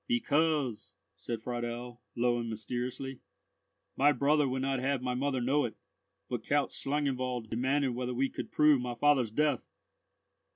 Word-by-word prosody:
"Because," 155 - +1 0.2
said 115 -2 -5
Friedel, 120 0 -4
low 120 0 +2
and 115 -1 -3
mysteriously—"my 125 +4 -3
brother 145 +2 +3
would 130 0 -1
not 135 -1 0
have 135 0 0
my 125 -1 0
mother 130 0 0
know 140 +4 +2
it, 120 - -4 0.5
but—Count 135 +4 0
Schlangenwald 130 -5 -2
demanded 135 +4 +1
whether 125 0 -3
we 135 +2 +2
could - - -6
prove 150 -4 +5
my 125 -1 -3
father's 130 -2 +3
death." 145 +3 0
130 Hz, 135 wpm, -31 LUFS, 120-140 Hz, 0.5 s, prove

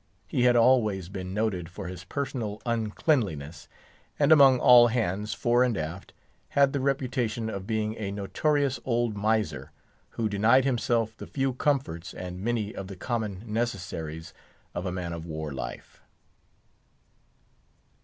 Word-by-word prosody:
He 125 - 0
had 125 -1 +5
always 110 -7 +3
been 95 -1 -6
noted 95 -5 -1
for 95 +2 -8
his 90 0 -8
personal 115 -4 -4
uncleanliness, 105 - -1 0.5
and 145 +1 +3
among 135 -4 +8
all 120 -1 +8
hands, 105 -3 -1
fore 120 +1 +3
and 125 -4 0
aft, 80 +4 -5 0.4
had 140 -1 +3
the 140 - 0
reputation 125 -4 -1
of 100 -1 -6
being 110 -1 -1
a 100 -3 -3
notorious 140 +8 0
old 120 -3 0
miser, 100 -10 -1 0.5
who 115 - +1
denied 110 +6 +4
himself 115 -3 0
the - - -9
few 135 -2 -1
comforts, 125 - -1
and 90 0 -6
many 110 -1 -1
of 95 -4 -6
the 95 - -8
common 105 -2 -3
necessaries 90 -8 -4 0.4
of 90 +2 -3
a - - -2
man 90 -2 -4
of 85 0 -7
war 80 -2 -5
life. 65 - -7
110 Hz, 145 wpm, -27 LUFS, 90-125 Hz, 0.5 s, among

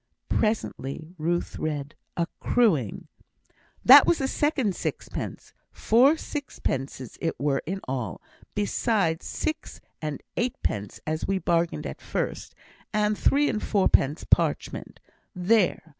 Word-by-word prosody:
Presently 165 - -1
Ruth 175 +3 -1
read, 145 -2 -3 0.2
"accruing." 170 - +1 0.8
"That 270 +3 +10
was 340 - +4
the 270 - -1
second 265 - +1
sixpence. - - -5 0.2
Four 260 +8 +4
sixpences 135 - -4
it 165 - -2
were 140 -1 +1
in 190 +2 -3
all, 125 - -3 0.4
besides 205 -5 0
six 315 - -4 0.2
and 150 -3 -4
eightpence 235 - -2
as 155 0 -2
we 195 - +1
bargained 170 -1 0
at - - -6
first, - - -3 0.4
and 210 0 +2
three 290 +7 +3
and 210 - -1
fourpence 170 -7 +2
parchment. - - 0 0.4
There! 185 +2 +2
180 Hz, 115 wpm, -26 LUFS, 150-230 Hz, 0.8 s, That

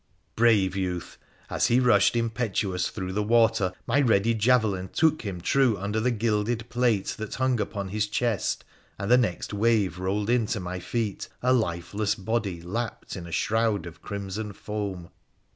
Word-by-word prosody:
Brave 110 -5 +3
youth! 90 -3 -3 0.3
As - - +1
he 120 - +4
rushed 125 -1 +4
impetuous 110 -5 -1
through 95 -2 -5
the 105 - 0
water 115 -3 +3
my 145 - +2
ready 115 -3 +3
javelin 110 -5 +2
took 160 -1 +2
him 100 -5 -5
true 125 +4 +2
under 105 +3 -2
the 120 +3 +1
gilded 115 0 0
plate 120 -5 +1
that 110 -1 -5
hung 130 -2 +1
upon 100 -2 -4
his 105 +1 -1
chest, 110 -2 -1 0.3
and 100 +4 -2
the 125 - +8
next 105 -4 -2
wave 105 -4 +2
rolled 100 +4 -1
in 120 -3 +2
to 120 -2 -1
my 90 0 -4
feet 110 +1 -3
a 130 +1 +4
lifeless 100 -1 0
body 100 -4 -2
lapped 115 +6 -4
in 90 -3 -7
a - - -9
shroud 110 0 +1
of 85 -1 -10
crimson 100 +1 -5
foam. 100 -5 -5
105 Hz, 165 wpm, -26 LUFS, 95-115 Hz, 0.3 s, the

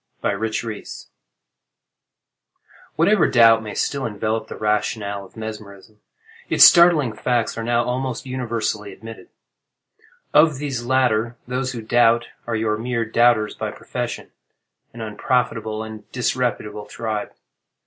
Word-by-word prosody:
MESMERIC 110 +3 -1
REVELATION 110 -3 -8 1.9
Whatever 170 +3 +4
doubt 115 -2 +6
may 105 -1 -7
still 140 -1 -1
envelop 110 +1 -2
the - - -8
rationale 105 -1 -1
of 95 - -17
mesmerism, 110 -1 -9 0.5
its - - +6
startling 170 - +7
facts 120 +2 -1
are 115 - -4
now 120 +1 +1
almost 130 0 -3
universally 115 -5 -3
admitted. 115 +3 -11 1.0
Of 150 -1 +5
these 135 -4 -4
latter, 120 -2 +1
those 125 +1 -2
who 115 -2 -6
doubt, 120 +1 +3 0.2
are 115 - -1
your 110 -1 0
mere 120 0 -1
doubters 115 -1 +3
by - - -4
profession—an 120 - -9
unprofitable 110 0 -1
and 110 -1 -10
disreputable 120 -4 -2
tribe. 110 -2 -4
115 Hz, 120 wpm, -21 LUFS, 110-125 Hz, 1.9 s, startling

